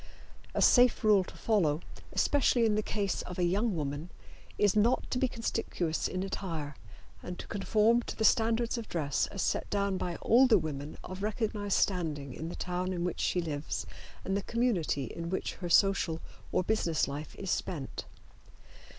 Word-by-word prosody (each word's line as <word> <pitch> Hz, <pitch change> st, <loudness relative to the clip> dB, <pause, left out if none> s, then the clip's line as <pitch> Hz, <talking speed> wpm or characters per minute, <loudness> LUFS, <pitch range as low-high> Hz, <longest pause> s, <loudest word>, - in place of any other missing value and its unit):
A -, -, +3 dB
safe 250 Hz, -1 st, +5 dB
rule 210 Hz, -3 st, +5 dB
to -, -, -12 dB
follow, 170 Hz, -9 st, +2 dB, 0.3 s
especially 255 Hz, -4 st, +3 dB
in 220 Hz, -, +3 dB
the 215 Hz, -, +1 dB
case 205 Hz, -2 st, -1 dB
of 180 Hz, -, -7 dB
a 180 Hz, -, +1 dB
young 200 Hz, +4 st, +1 dB
woman, 145 Hz, +2 st, -3 dB, 0.5 s
is 205 Hz, -1 st, +3 dB
not 225 Hz, +4 st, +3 dB
to 250 Hz, -, 0 dB
be 260 Hz, -, +3 dB
conspicuous 225 Hz, -8 st, -2 dB
in 185 Hz, 0 st, -3 dB
attire 165 Hz, -7 st, -4 dB, 0.5 s
and 180 Hz, 0 st, -6 dB
to -, -, -7 dB
conform 220 Hz, +3 st, +2 dB
to -, -, -4 dB
the 220 Hz, -, 0 dB
standards 230 Hz, +2 st, +2 dB
of 225 Hz, -, -8 dB
dress 145 Hz, -5 st, 0 dB
as 195 Hz, -, -3 dB
set -, -, -1 dB
down 200 Hz, -2 st, 0 dB
by 175 Hz, -1 st, -2 dB
older 250 Hz, 0 st, +6 dB
women 145 Hz, -1 st, -4 dB
of 185 Hz, +1 st, -7 dB
recognized 210 Hz, -1 st, -1 dB
standing 155 Hz, -8 st, -1 dB
in 160 Hz, +5 st, -5 dB
the -, -, -6 dB
town 180 Hz, +1 st, -2 dB
in 175 Hz, -1 st, -2 dB
which 180 Hz, -1 st, -2 dB
she 180 Hz, -, +1 dB
lives 150 Hz, -3 st, -3 dB, 0.4 s
and 195 Hz, -, 0 dB
the 200 Hz, -, 0 dB
community 210 Hz, -, 0 dB
in 170 Hz, +7 st, -5 dB
which 190 Hz, -, -2 dB
her 175 Hz, -2 st, -5 dB
social 190 Hz, -3 st, +3 dB, 0.3 s
or 185 Hz, -, +2 dB
business 175 Hz, -6 st, +1 dB
life 145 Hz, +2 st, -6 dB
is 195 Hz, -2 st, -4 dB
spent. 150 Hz, -7 st, -3 dB
190 Hz, 175 wpm, -31 LUFS, 165-220 Hz, 0.5 s, older